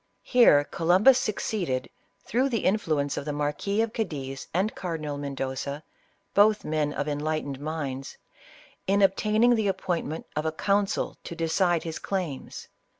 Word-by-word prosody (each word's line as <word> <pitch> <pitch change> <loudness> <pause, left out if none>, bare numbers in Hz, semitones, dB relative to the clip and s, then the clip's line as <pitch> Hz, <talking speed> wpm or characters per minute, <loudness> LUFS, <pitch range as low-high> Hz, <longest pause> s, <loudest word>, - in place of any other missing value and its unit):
Here 235 - +6
Columbus 185 - +4
succeeded, 190 - -2 0.4
through 255 +4 +1
the 230 -4 -1
influ 175 -7 +1
ence 140 0 -2
of - - -3
the 150 - -2
Marquis 150 +9 0
of 225 0 -4
Cadiz 135 - -4
and 190 +5 0
Cardinal 155 -5 -4
Mendoza, 140 +1 -4 0.5
both 210 +1 +4
men 150 -1 0
of - - -3
enlightened 145 -2 -2
minds, 145 -3 -4 0.7
in 200 +1 +3
obtaining 215 +5 +4
the 220 -3 +1
ap 190 - -1
pointment 170 -4 -3
of 150 - 0
a - - +1
council 200 +5 0
to 170 - -7
decide 165 +1 +1
his 165 -1 -5
claims. 180 -9 -4
165 Hz, 150 wpm, -27 LUFS, 145-205 Hz, 0.7 s, Here